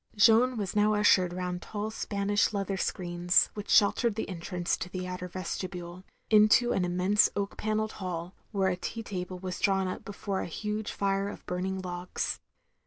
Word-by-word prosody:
Jeanne 230 +4 +5
was 200 -3 -3
now 210 0 +4
ushered 190 -3 +4
rotmd 180 0 -3
tall 215 +1 -4
Spanish 205 -1 0
leather 195 -1 -1
screens, 175 -1 +1
which 210 0 -7
sheltered 215 +2 +4
the 220 - -3
entrance 175 -1 -2
to 180 - -6
the 185 0 -4
outer 180 0 -5
vestibule 180 0 -5
— - - -41
^into 215 +3 +5
an 190 - +1
immense 180 +4 +3
oak 200 0 -2
pan 215 0 -1
nelled 215 0 -1
hall, 180 -2 -5 0.2
where 195 -3 +1
a 180 - 0
tea 225 +5 -5
table 185 -3 -5
was 180 0 -5
drawn 195 -1 +2
up 185 - -5
before 200 -1 -4
a - - -4
huge 210 +5 -3
fire 195 0 0
of - - -10
burning 190 +1 -2
logs. 180 0 -3
195 Hz, 180 wpm, -29 LUFS, 180-210 Hz, 0.2 s, Jeanne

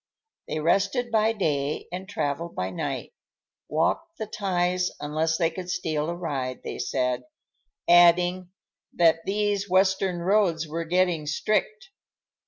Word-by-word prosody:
They - - -3
rested 200 - +1
by 220 0 +3
day 150 -8 -1
and 185 +2 -6
traveled 165 -1 -3
by 90 +1 -2
night; 90 - -4 0.6
walked 330 - 0
the 220 - -3
ties 180 -3 0
unless 155 +2 0
they 165 -1 +1
could 180 +2 -7
steal 155 -3 -1
a 170 - -3
ride, 135 -7 -4
they - - -6
said; 125 0 -1 0.7
adding 175 +1 +5 0.5
that 165 -1 +4
"these 205 0 0
Western 190 -1 +2
roads 180 -5 +2
were 165 +2 -4
getting 175 -3 +1
strict." 390 - -1
175 Hz, 130 wpm, -26 LUFS, 155-195 Hz, 0.7 s, adding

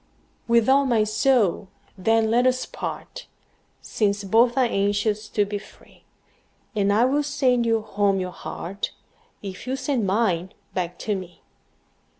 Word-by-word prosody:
With 235 -1 +3
all 275 +1 +4
my 230 -4 +3
soul, 215 -3 +2 0.3
then, 225 +3 +2
let 245 +2 +4
us 255 0 +1
part, - - -7 0.6
Since 200 -1 0
both 235 +5 +3
are 260 - +4
anxious 205 0 0
to 205 - +1
be 205 0 -4
free; - - -19 0.7
And 200 -1 +2
I 220 +4 +4
will 280 +3 +2
sand 260 -5 +1
you 225 -1 +2
home 200 -2 0
your 185 -1 -3
heart, 190 +2 -6 0.5
If 195 +3 -8
you 260 - -1
will - - -1
send 260 -5 -1
mine 190 -3 0 0.2
back 180 -1 -3
to 210 - 0
me. 180 -3 -9
215 Hz, 155 wpm, -24 LUFS, 200-245 Hz, 0.7 s, all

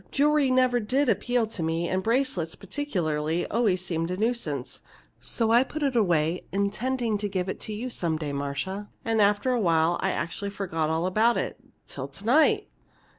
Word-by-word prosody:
Jewelry 295 -1 +3
never 255 -1 +3
did 255 +5 +1
appeal 245 0 +1
to 215 -5 -6
me, 165 +1 0
and 185 +1 0
bracelets, 225 -8 0
particularly, 170 - -2
always 200 -6 +1
seemed 165 -1 -2
a 180 - -2
nuisance. 205 - -2 0.4
So 225 -1 -1
I 240 +2 +6
put 300 +3 -5
it 275 -3 +1
away 170 -6 +1
intending 215 +3 0
to 205 0 -2
give 185 -1 -2
it 190 - -4
to 215 - -6
you 245 +4 -4
some 165 -7 -1
day, 150 -2 -4
Marcia. 145 +9 -3 0.2
And 225 -1 +2
after 205 +5 +3
a 250 - +1
while 165 -2 +2
I 190 - +1
actually 190 +3 -3
forgot 175 -6 -2
all 160 +2 0
about 220 +6 +3
it - - -3 0.3
till 135 -1 -6
to 170 +9 -13
night!" 315 - +4
200 Hz, 180 wpm, -26 LUFS, 170-245 Hz, 0.4 s, I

